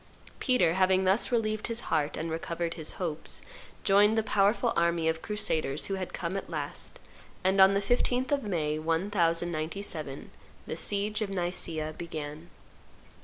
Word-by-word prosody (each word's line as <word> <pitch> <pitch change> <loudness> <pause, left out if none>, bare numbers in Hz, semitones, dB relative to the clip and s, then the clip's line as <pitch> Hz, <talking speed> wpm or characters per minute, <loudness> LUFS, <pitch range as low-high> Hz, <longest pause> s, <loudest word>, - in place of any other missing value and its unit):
Peter, 185 -11 +3
having 190 +1 +3
thus 190 +7 +2
relieved 215 -2 0
his 230 0 +1
heart 150 -2 0
and 165 +1 -3
recovered 170 +1 -2
his 160 -2 -3
hopes, 160 -4 -2 0.4
joined 205 +3 +5
the 220 - +3
powerful 215 +3 +2
army 170 -1 +2
of 160 0 0
crusaders 160 -9 -1
who 195 - -2
had 190 -2 -3
come 170 +2 -3
at 195 - -4
last; 150 -4 -4 0.5
and, 190 +1 +4
on 190 +1 +7
the 200 - +2
15th 245 +4 +1
of 285 -1 +2
May, 155 - -1
1097, 165 -2 -1 0.3
the - - -4
siege 205 +2 -1
of 210 - -1
Nicaea 175 -4 -2
began. 155 -1 -6
180 Hz, 150 wpm, -29 LUFS, 160-205 Hz, 0.5 s, on